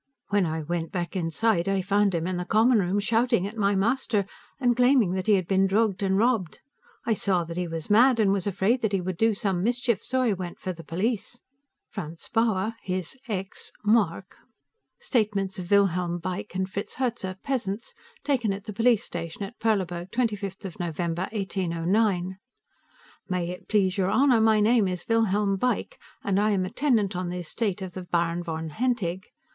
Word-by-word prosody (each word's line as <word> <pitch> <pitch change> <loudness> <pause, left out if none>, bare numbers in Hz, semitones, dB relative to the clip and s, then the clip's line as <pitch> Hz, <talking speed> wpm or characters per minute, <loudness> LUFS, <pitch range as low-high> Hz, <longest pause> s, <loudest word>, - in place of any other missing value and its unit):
When 200 -3 +2
I 160 0 -3
went 165 +1 -3
back 175 0 -3
inside, 180 +2 +1
I 195 -1 +1
found 200 0 +2
him 165 0 -1
in 185 0 -2
the 180 - -2
common 225 +4 +4
room 190 +1 +1
shouting 230 -1 +2
at 205 +3 -6
my 200 -2 +2
master, 220 0 +1 0.3
and 245 -3 +3
claiming 250 -5 +4
that 185 +1 -2
he 215 - +5
had 185 -3 -1
been 195 0 +3
drugged 205 0 +1
and 190 -1 +2
robbed. 220 -6 +1 0.5
I 230 - +2
saw 190 -4 +1
that 165 0 -7
he 180 0 -2
was 165 -1 -5
mad 240 +3 +6
and 205 -3 +4
was 195 -1 0
afraid 200 +6 +1
that 220 -2 0
he 195 - +2
would 180 0 -3
do 225 +4 +2
some 195 -4 -1
mischief, 240 0 0
so 260 0 0
I 230 -4 +2
went 180 -2 -6
for 185 - -3
the 165 -1 -11
police. 215 +7 -2 0.5
Franz 165 -5 -7
Bauer 225 -2 +1
his 185 +2 -3
(x) 195 -3 -3
mark 200 -4 +1 0.6
(Statements 210 - 0
of 180 -1 -6
Wilhelm 180 -3 +2
Beick 180 +2 -5
and 190 0 0
Fritz 200 +2 -5
Herzer, 235 -8 -2
peasants, 230 -5 -3 0.3
taken 245 -7 +1
at 195 0 -7
the 210 - -7
police 230 +1 +3
station 165 +3 -6
at 200 +5 -8
Perleburg, 185 -5 0
25 205 -5 -3
November, 170 +1 -2
1809.) 190 -1 0 0.9
May 180 -2 -1
it 180 - -9
please 195 -2 +2
your 190 0 +2
honor, 260 -2 +4
my 220 -1 +4
name 220 -1 +4
is 180 -2 -4
Wilhelm 210 -3 +2
Beick, 245 +2 -1 0.2
and 200 -1 +1
I 210 +1 +3
am 190 -3 +1
a 185 - -6
tenant 230 -10 +1
on 180 0 -2
the 180 - -4
estate 190 +3 -2
of 185 -2 -7
the 185 - -5
Baron 170 -1 0
von 160 -2 -4
Hentig. 205 -4 -1
195 Hz, 185 wpm, -26 LUFS, 180-225 Hz, 0.9 s, mad